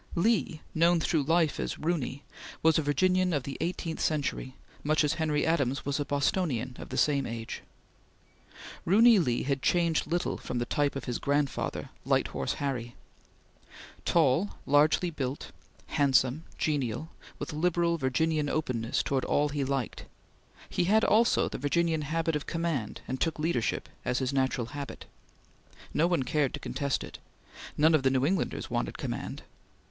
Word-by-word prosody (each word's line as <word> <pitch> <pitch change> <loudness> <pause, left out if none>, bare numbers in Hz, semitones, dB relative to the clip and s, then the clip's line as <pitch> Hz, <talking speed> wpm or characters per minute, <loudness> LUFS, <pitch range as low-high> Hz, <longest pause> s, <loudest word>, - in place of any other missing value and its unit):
Lee, 175 -4 +1
known 170 +1 +4
through 160 -1 +1
life 160 +2 +2
as - - -2
"Roony," 150 -4 -2 0.4
was 160 0 +5
a - - +2
Virginian 180 +5 +2
of 145 -4 0
the 135 - -5
eighteenth 165 -1 -3
century, 140 -3 -1 0.3
much 155 +1 +2
as 150 - +2
Henry 150 -2 +1
Adams 140 -5 0
was 140 +1 -1
a 145 - -1
Bostonian 140 -3 0
of - - -8
the - - -4
same 140 -3 +2
age. 115 -1 -5 1.2
Roony 220 +4 +6
Lee 120 -4 0
had 140 0 -1
changed 170 -1 +2
little 175 +1 -1
from 125 - -4
the 120 - 0
type 145 +3 0
of 135 - -4
his 125 -2 -2
grandfather, 140 -1 -1
Light - - +1
Horse - - -2
Harry. 125 -4 -3 1.1
Tall, 165 +4 +2
largely 150 +5 +3
built, 135 -3 -4 0.3
handsome, 135 +1 +2
genial, 145 0 -1 0.3
with - - -5
liberal 170 +1 +1
Virginian 150 +3 +1
openness 125 -7 -1
towards 135 -2 -1
all 145 +1 +2
he 145 -1 -1
liked, 135 -3 -2 0.6
he 175 - 0
had 215 +4 +4
also 230 +2 +4
the - - -5
Virginian 160 +3 +1
habit 165 +2 -1
of 150 - -3
command 165 -10 -2
and 130 +1 -4
took 165 - 0
leadership 150 -7 -1 0.2
as 125 - 0
his 130 +1 -1
natural 130 -3 0
habit. 145 -1 -6 0.9
No 160 +3 +3
one 175 -6 +1
cared 145 +1 0
to - - -8
contest 140 -1 -2
it. - - -9 0.6
None 160 +2 +5
of 155 - +4
the 130 - +3
New 130 0 +2
Englanders 180 +3 -1
wanted - - -2
command. - - -5
150 Hz, 160 wpm, -29 LUFS, 135-165 Hz, 1.2 s, Roony